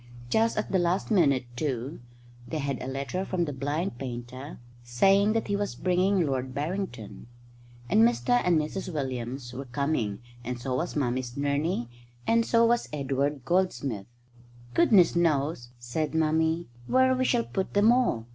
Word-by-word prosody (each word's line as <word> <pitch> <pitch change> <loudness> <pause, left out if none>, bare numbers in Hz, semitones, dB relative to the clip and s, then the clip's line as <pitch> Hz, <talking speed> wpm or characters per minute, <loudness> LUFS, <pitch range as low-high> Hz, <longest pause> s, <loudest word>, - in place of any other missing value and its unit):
Just 225 +1 +2
at 215 - -2
the 190 - +3
last 175 +5 0
minute, 140 - +3
too, 135 +1 -3 0.5
they 160 - -3
had 140 -3 -2
a - - -5
letter 140 +8 -3
from 185 -3 -1
the 145 - -4
blind 145 +2 -2
painter 130 +2 -7 0.3
saying 195 - +3
that 225 - -1
he 200 - 0
was 200 0 -2
bringing 185 0 +2
Lord 130 -2 -2
Barrington. 140 - -4 0.6
And 210 +4 +4
Mr 240 +1 +3
and 180 -2 +3
Mrs 155 +5 -3
Williams 130 -3 -4
were 135 +2 -6
coming, 125 -6 -1 0.3
and 125 0 -4
so 130 +1 -3
was 170 - -3
Mummy's 125 -3 -1
nurney, 145 -1 0 0.4
and 230 0 +3
so 230 0 +4
was 235 +1 +1
Edward 140 -1 -1
Goldsmith. 140 - 0 0.7
"Goodness 210 - +5
knows," 150 -6 +1
said 125 +7 -3
Mummy, 160 +1 +1 0.2
"where 260 0 +4
we 255 0 +1
shall 240 -2 +2
put 190 0 -3
them 205 +3 +6
all. 240 - +1
155 Hz, 155 wpm, -27 LUFS, 130-190 Hz, 0.7 s, them